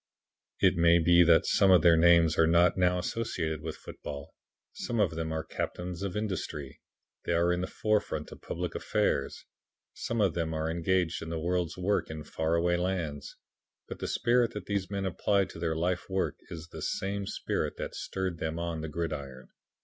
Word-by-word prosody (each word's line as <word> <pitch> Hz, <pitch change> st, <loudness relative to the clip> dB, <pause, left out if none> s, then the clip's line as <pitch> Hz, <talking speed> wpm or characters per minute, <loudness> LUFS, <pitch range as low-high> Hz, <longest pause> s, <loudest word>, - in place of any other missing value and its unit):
It -, -, +4 dB
may 85 Hz, 0 st, +6 dB
be 85 Hz, +1 st, +5 dB
that 85 Hz, -1 st, +5 dB
some 100 Hz, -, +4 dB
of 90 Hz, -4 st, +6 dB
their 85 Hz, -1 st, +7 dB
names 85 Hz, -1 st, +5 dB
are 80 Hz, -, +4 dB
not 85 Hz, +1 st, +4 dB
now 90 Hz, -1 st, +2 dB
associated 90 Hz, -5 st, -2 dB
with 80 Hz, 0 st, -5 dB
football. 70 Hz, +2 st, -8 dB, 0.4 s
Some 120 Hz, -2 st, -3 dB
of 100 Hz, -6 st, +3 dB
them 80 Hz, 0 st, -3 dB
are 80 Hz, 0 st, -2 dB
captains 90 Hz, +2 st, -5 dB
of 100 Hz, -1 st, -3 dB
industry. 85 Hz, -9 st, -4 dB, 0.4 s
They -, -, 0 dB
are 85 Hz, +1 st, +3 dB
in 90 Hz, -, -1 dB
the 90 Hz, -, -2 dB
forefront 105 Hz, -1 st, -1 dB
of -, -, -11 dB
public 90 Hz, +1 st, -4 dB
affairs. -, -, -1 dB, 0.5 s
Some 115 Hz, -, -3 dB
of 100 Hz, -5 st, +3 dB
them 80 Hz, -2 st, -2 dB
are 80 Hz, +1 st, -1 dB
engaged 85 Hz, 0 st, 0 dB
in 80 Hz, -, -6 dB
the 85 Hz, -, -3 dB
world's 85 Hz, +1 st, -1 dB
work 95 Hz, +3 st, 0 dB
in 80 Hz, -1 st, -6 dB
far 80 Hz, +2 st, -1 dB
away 85 Hz, +1 st, +2 dB
lands. 85 Hz, -5 st, -3 dB, 0.5 s
But -, -, -7 dB
the -, -, -3 dB
spirit 120 Hz, 0 st, +2 dB
that 105 Hz, -3 st, -5 dB
these 100 Hz, -2 st, -2 dB
men 100 Hz, -1 st, -2 dB
apply 100 Hz, +2 st, +1 dB
to 85 Hz, -, -11 dB
their 80 Hz, -1 st, -1 dB
life 90 Hz, +3 st, -1 dB
work 95 Hz, 0 st, 0 dB
is 80 Hz, 0 st, -8 dB
the -, -, -9 dB
same 100 Hz, 0 st, -2 dB
spirit -, -, -2 dB
that -, -, -5 dB
stirred 95 Hz, -3 st, -4 dB
them 80 Hz, 0 st, -3 dB
on 85 Hz, -1 st, -3 dB
the 80 Hz, -, -5 dB
gridiron. 75 Hz, -5 st, -5 dB
85 Hz, 190 wpm, -29 LUFS, 80-95 Hz, 0.5 s, their